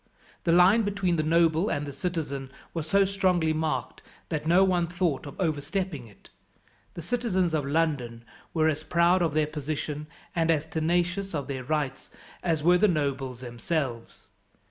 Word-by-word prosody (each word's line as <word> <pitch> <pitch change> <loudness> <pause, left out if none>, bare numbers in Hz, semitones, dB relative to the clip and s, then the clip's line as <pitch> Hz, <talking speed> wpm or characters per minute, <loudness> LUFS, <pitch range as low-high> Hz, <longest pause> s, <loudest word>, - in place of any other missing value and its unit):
The 170 - +3
line 180 +6 +6
between 195 -4 0
the - - +2
noble 165 +4 +3
and 145 0 -1
the 140 - -6
citizen 145 -6 -3 0.2
was 160 -2 -4
so 200 +2 +4
strongly 185 -5 +1
marked 155 0 -2 0.3
that 155 -1 -3
no 175 +3 +6
one 180 -3 +2
thought 170 -6 -1
of 140 - -10
overstepping 155 -3 -2
it. 105 - -19 0.7
The 170 - -6
citizens 190 -6 0
of 150 -3 0
London 140 -7 -1 0.3
were 160 -1 +2
as 155 -1 0
proud 170 +3 +3
of 160 -4 0
their 155 -1 +3
position 150 0 -4 0.3
and 165 -1 +1
as 160 -1 +2
tenacious 175 +4 0
of 140 -3 -3
their 130 -2 -4
rights 145 -1 -2 0.3
as 160 -4 0
were 180 +2 +5
the 210 - +5
nobles 135 - -1
themselves. 120 -1 -4
160 Hz, 165 wpm, -27 LUFS, 145-180 Hz, 0.7 s, line